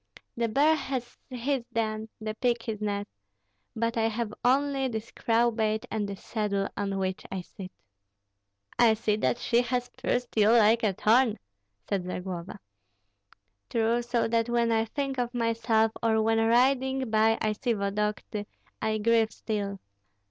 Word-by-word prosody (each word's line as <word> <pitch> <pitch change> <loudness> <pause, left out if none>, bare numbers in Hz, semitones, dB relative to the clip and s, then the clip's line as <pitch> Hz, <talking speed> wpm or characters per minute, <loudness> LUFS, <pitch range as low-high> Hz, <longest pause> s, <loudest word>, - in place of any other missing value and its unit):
The 235 0 0
bear 285 +7 +4
has 260 -5 -3
his 255 +1 -1
den, 220 -1 -2
the 215 0 -4
pig 235 +1 0
his 215 -2 -4
nest, 205 -1 -2 0.7
but 230 +1 -1
I 225 0 +3
have 225 -1 -3
only 270 +1 +2
this 220 -2 -5
crowbait 225 -2 +1
and 210 -2 -2
this 195 -1 -8
saddle 200 -3 -1
on 200 -1 -2
which 190 -1 -2
I 190 - -3
sit." 185 +1 -10 1.1
"I 230 -2 +6
see 215 -1 0
that 215 - +1
she 240 0 +2
has 245 0 -2
pierced 250 -1 -2
you 215 -1 +5
like 225 0 +5
a 210 -3 +1
thorn," 225 +4 +3 0.5
said 195 -3 -1
Zagloba. 180 -1 -5 1.1
"True, 230 +1 +1
so 240 -1 0
that 230 0 +1
when 235 -1 +2
I 225 0 +2
think 275 +2 -3
of 245 0 -2
myself 230 -1 +2
or 225 -1 +2
when 225 +1 +2
riding 260 +2 +2
by 220 +1 +4
I 215 - +1
see 235 +3 -1
Vodokty, 210 0 -2 0.3
I 215 0 0
grieve 225 0 +3
still. 200 -3 -4
225 Hz, 155 wpm, -28 LUFS, 215-240 Hz, 1.1 s, I